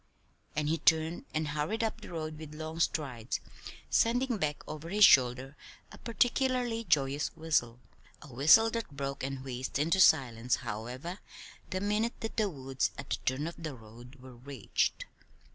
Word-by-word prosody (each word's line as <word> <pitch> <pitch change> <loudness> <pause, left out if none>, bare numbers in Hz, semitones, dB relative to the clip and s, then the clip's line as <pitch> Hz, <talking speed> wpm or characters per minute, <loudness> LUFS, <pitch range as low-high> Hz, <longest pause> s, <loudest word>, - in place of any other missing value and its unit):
And 150 -1 0
he 160 +2 0
turned 160 +1 +2
and 155 -1 -1
hurried 150 +10 -1
up 225 0 -2
the - - -10
road 155 -2 -5
with 155 -1 -9
long 160 +1 -6
strides, 135 -8 -1 0.5
sending 245 +1 +2
back 150 -3 -2
over 155 +2 -7
his 205 +2 +7
shoulder 130 0 +4 0.4
a - - -12
particularly 245 0 0
joyous 145 -3 +1
whistle 155 -8 0 0.4
a 145 -4 -13
whistle 160 - +6
that 230 -1 -3
broke 140 -1 -4
and 135 -1 -4
wheezed 130 -1 -4
into 165 +6 +1
silence, 125 -8 +4
however, 125 - -5 0.5
the 185 -1 -2
minute 210 +3 0
that 225 - -5
the 215 -2 +2
woods 135 -4 -2
at 135 - -9
the - - +1
turn 130 +4 0
of 170 0 -7
the 155 -4 -5
road 120 +3 -14
were 130 0 -13
reached. 130 -3 -2
150 Hz, 160 wpm, -31 LUFS, 130-185 Hz, 0.5 s, his